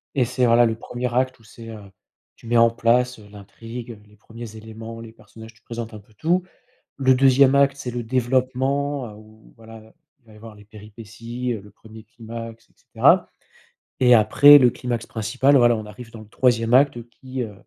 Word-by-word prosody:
Et 130 Hz, -3 st, +2 dB
c'est, 125 Hz, +1 st, -1 dB
voilà, 120 Hz, 0 st, +4 dB
le 115 Hz, -1 st, -1 dB
1er 120 Hz, +1 st, -5 dB
acte 130 Hz, 0 st, -1 dB
où -, -, -23 dB
c'est, 115 Hz, +1 st, -13 dB
heu, 110 Hz, -1 st, -9 dB, 0.6 s
tu -, -, -20 dB
mets 120 Hz, +1 st, +1 dB
en 115 Hz, 0 st, +5 dB
place, 120 Hz, +2 st, 0 dB
heu, 105 Hz, -2 st, -16 dB
l'intrigue, 115 Hz, +4 st, -10 dB
heu, 110 Hz, -, -13 dB
les 105 Hz, -, -23 dB
1ers 110 Hz, 0 st, -11 dB
éléments, 110 Hz, +1 st, -10 dB
les 115 Hz, -1 st, -11 dB
personnages, 110 Hz, 0 st, -15 dB
tu 120 Hz, -, -28 dB
présentes 115 Hz, -1 st, -8 dB
un 105 Hz, -, -9 dB
peu 105 Hz, +2 st, -27 dB
tout. 175 Hz, -, -1 dB, 0.5 s
Le 130 Hz, -1 st, +3 dB
2e 135 Hz, +1 st, +4 dB
acte, 140 Hz, 0 st, +3 dB
c'est 130 Hz, -3 st, -6 dB
le 120 Hz, 0 st, -5 dB
développement, 130 Hz, +2 st, -1 dB
heu, 105 Hz, -, -12 dB
où 110 Hz, +1 st, -19 dB
voilà, 110 Hz, -1 st, -15 dB, 0.3 s
il 125 Hz, -, -40 dB
va 110 Hz, -, -18 dB
y -, -, -17 dB
avoir 110 Hz, 0 st, -13 dB
les 105 Hz, 0 st, -17 dB
péripéties, 115 Hz, +3 st, -8 dB
heu, 110 Hz, -, -7 dB
le 105 Hz, +1 st, -16 dB
1er 110 Hz, +1 st, -15 dB
climax 115 Hz, 0 st, -11 dB
et -, -, -31 dB
cetera. -, -, +2 dB, 0.7 s
Et 125 Hz, -1 st, +5 dB
après, 145 Hz, +6 st, +7 dB
le 125 Hz, -3 st, +4 dB
climax 120 Hz, -2 st, -5 dB
principal, 125 Hz, +6 st, 0 dB
voilà, 120 Hz, -2 st, +4 dB
on 110 Hz, -1 st, -6 dB
arrive 115 Hz, +3 st, -12 dB
dans 110 Hz, -, -11 dB
le 110 Hz, -, -15 dB
3e 115 Hz, -1 st, 0 dB
acte, 135 Hz, 0 st, +4 dB
heu, 120 Hz, -, -8 dB
qui, 130 Hz, -1 st, -7 dB
heu, 110 Hz, -3 st, -8 dB
115 Hz, 210 wpm, -21 LUFS, 110-125 Hz, 0.7 s, après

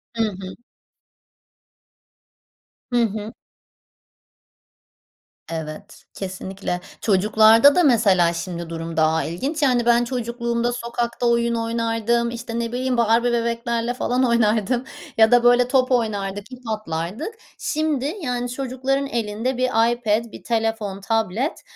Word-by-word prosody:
Hı 225 Hz, -, +1 dB
hı. 190 Hz, -3 st, -5 dB, 2.4 s
Hı 240 Hz, -1 st, +3 dB
hı. 215 Hz, +1 st, -5 dB, 2.2 s
Evet 155 Hz, -2 st, -7 dB
kesinlikle. 190 Hz, -1 st, -5 dB, 0.2 s
Çocuklarda 220 Hz, +6 st, +5 dB
da 360 Hz, -, +4 dB
mesela 200 Hz, -, +4 dB
şimdi 170 Hz, -1 st, -5 dB
durum 165 Hz, 0 st, -6 dB
daha 160 Hz, 0 st, +2 dB
ilginç 270 Hz, -, -3 dB
yani 250 Hz, -4 st, +2 dB
ben 240 Hz, 0 st, +4 dB
çocukluğumda 235 Hz, -1 st, -2 dB
sokakta 235 Hz, 0 st, -3 dB
oyun 235 Hz, 0 st, +2 dB
oynardım, 230 Hz, 0 st, 0 dB
işte 235 Hz, 0 st, -5 dB
ne 230 Hz, -1 st, -2 dB
bileyim 255 Hz, 0 st, -1 dB
Barbie 235 Hz, +1 st, +3 dB
bebeklerle 235 Hz, 0 st, -1 dB
falan 250 Hz, +1 st, 0 dB
oynardım 235 Hz, 0 st, +2 dB, 0.3 s
ya 220 Hz, +1 st, +6 dB
da 245 Hz, -1 st, +5 dB
böyle 245 Hz, 0 st, +5 dB
top 255 Hz, 0 st, +2 dB
oynardık, 205 Hz, -2 st, -1 dB
ip 250 Hz, -, -9 dB
atlardık. 215 Hz, -, -4 dB, 0.2 s
Şimdi 300 Hz, -2 st, -1 dB
yani 245 Hz, -4 st, -2 dB
çocukların 270 Hz, +2 st, -2 dB
elinde 235 Hz, +1 st, -2 dB
bir 255 Hz, -, -1 dB, 0.3 s
iPad, 230 Hz, -1 st, -1 dB
bir -, -, -11 dB
telefon, 225 Hz, -4 st, -2 dB
tablet, 225 Hz, -, -1 dB
235 Hz, 115 wpm, -22 LUFS, 210-245 Hz, 2.4 s, ya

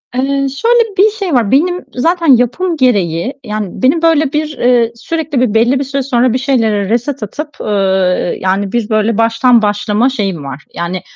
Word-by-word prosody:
Eee, 275 Hz, +2 st, 0 dB
şöyle 455 Hz, -, +1 dB
bir 420 Hz, +3 st, +4 dB
şey 400 Hz, -6 st, -4 dB
var. 235 Hz, -6 st, +1 dB
Benim 355 Hz, +6 st, +1 dB
zaten 335 Hz, +6 st, 0 dB
yapım 330 Hz, +9 st, -1 dB
gereği, 205 Hz, -, 0 dB
yani, 210 Hz, -3 st, -4 dB
benim 280 Hz, +6 st, +2 dB
böyle 315 Hz, -4 st, +2 dB
bir, 300 Hz, -1 st, -2 dB
eee, 240 Hz, -2 st, +2 dB
sürekli 300 Hz, +1 st, -3 dB
bir, 240 Hz, -4 st, +1 dB
belli 240 Hz, +4 st, +2 dB
bir -, -, -1 dB
süre 275 Hz, +1 st, -3 dB
sonra 250 Hz, -2 st, +1 dB
bir -, -, +1 dB
şeylere 225 Hz, -7 st, 0 dB
reset 245 Hz, +3 st, -1 dB
atıp, 295 Hz, +9 st, -6 dB
ııı, 190 Hz, -3 st, 0 dB
yani, 195 Hz, +1 st, -1 dB
bir, 235 Hz, -2 st, -2 dB
böyle, 215 Hz, 0 st, +1 dB
baştan 230 Hz, +1 st, +3 dB
başlama 210 Hz, +3 st, 0 dB
şeyim 195 Hz, -, -3 dB
var. 140 Hz, +1 st, -8 dB
Yani, 170 Hz, +2 st, -4 dB
245 Hz, 180 wpm, -13 LUFS, 210-290 Hz, -, bir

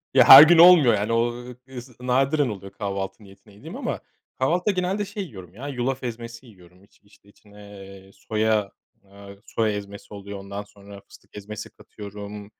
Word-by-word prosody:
Ya, -, -, +6 dB
her 135 Hz, +3 st, +12 dB
gün 165 Hz, +1 st, +5 dB
olmuyor 165 Hz, -8 st, +7 dB
yani 105 Hz, +2 st, -1 dB
o 120 Hz, +1 st, 0 dB, 0.3 s
is 125 Hz, -2 st, -12 dB
nadiren 135 Hz, +2 st, 0 dB
oluyor 100 Hz, -2 st, -9 dB
kahvaltı 100 Hz, 0 st, -6 dB
niyetine 100 Hz, +1 st, -19 dB
yediğim 100 Hz, -, -12 dB
ama -, -, -4 dB, 0.4 s
kahvaltıda 175 Hz, +9 st, 0 dB
genelde 185 Hz, +2 st, -2 dB
şey 205 Hz, 0 st, -6 dB
yiyorum 95 Hz, -, -12 dB
ya 130 Hz, +7 st, -9 dB
yulaf 130 Hz, -1 st, -4 dB
ezmesi 115 Hz, +1 st, -8 dB
yiyorum. 90 Hz, -3 st, -20 dB
İç 100 Hz, -, -27 dB
işte 100 Hz, 0 st, -25 dB
içine, 105 Hz, 0 st, -21 dB, 0.3 s
eee, 95 Hz, 0 st, -15 dB
soya, 110 Hz, -2 st, -1 dB, 0.4 s
aaa, 100 Hz, 0 st, -13 dB
soya 110 Hz, -2 st, -1 dB
ezmesi 100 Hz, 0 st, -9 dB
oluyor. 100 Hz, 0 st, -9 dB
Ondan 100 Hz, +1 st, -8 dB
sonra 100 Hz, -1 st, -15 dB
fıstık -, -, -17 dB
ezmesi 105 Hz, 0 st, -9 dB
katıyorum. 105 Hz, 0 st, -11 dB
105 Hz, 165 wpm, -23 LUFS, 100-130 Hz, 0.4 s, her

